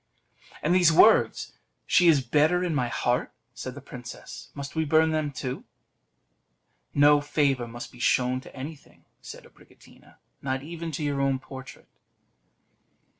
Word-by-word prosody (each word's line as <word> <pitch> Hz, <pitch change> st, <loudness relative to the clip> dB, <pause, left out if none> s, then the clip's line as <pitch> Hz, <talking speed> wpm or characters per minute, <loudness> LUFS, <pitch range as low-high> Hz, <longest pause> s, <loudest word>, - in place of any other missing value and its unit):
"And 165 Hz, -, +2 dB
these 175 Hz, -2 st, +5 dB
words 215 Hz, +7 st, +4 dB, 0.3 s
'She 175 Hz, -, +4 dB
is 150 Hz, -5 st, +5 dB
better 155 Hz, +8 st, +2 dB
in 175 Hz, -3 st, -1 dB
my 130 Hz, -5 st, 0 dB
heart,'" 120 Hz, 0 st, -1 dB, 0.2 s
said 125 Hz, +2 st, -7 dB
the 140 Hz, -, -9 dB
princess; 125 Hz, -1 st, -10 dB
"must 140 Hz, -1 st, -7 dB
we 160 Hz, -, +1 dB
burn 160 Hz, +1 st, +3 dB
them 155 Hz, -2 st, -1 dB
too?" 130 Hz, -1 st, -5 dB, 1.3 s
"No 145 Hz, +1 st, +5 dB
favour 140 Hz, -4 st, 0 dB
must 120 Hz, +1 st, -9 dB
be 125 Hz, -, -16 dB
shown 125 Hz, +1 st, +1 dB
to -, -, -14 dB
anything," 140 Hz, +3 st, -10 dB, 0.2 s
said -, -, -10 dB
Abricotina, -, -, -20 dB, 0.3 s
"not 130 Hz, 0 st, -3 dB
even 165 Hz, +1 st, -6 dB
to 150 Hz, -, -3 dB
your 140 Hz, -1 st, -1 dB
own 135 Hz, -1 st, +1 dB
portrait." 130 Hz, 0 st, -11 dB
140 Hz, 145 wpm, -26 LUFS, 130-155 Hz, 1.3 s, these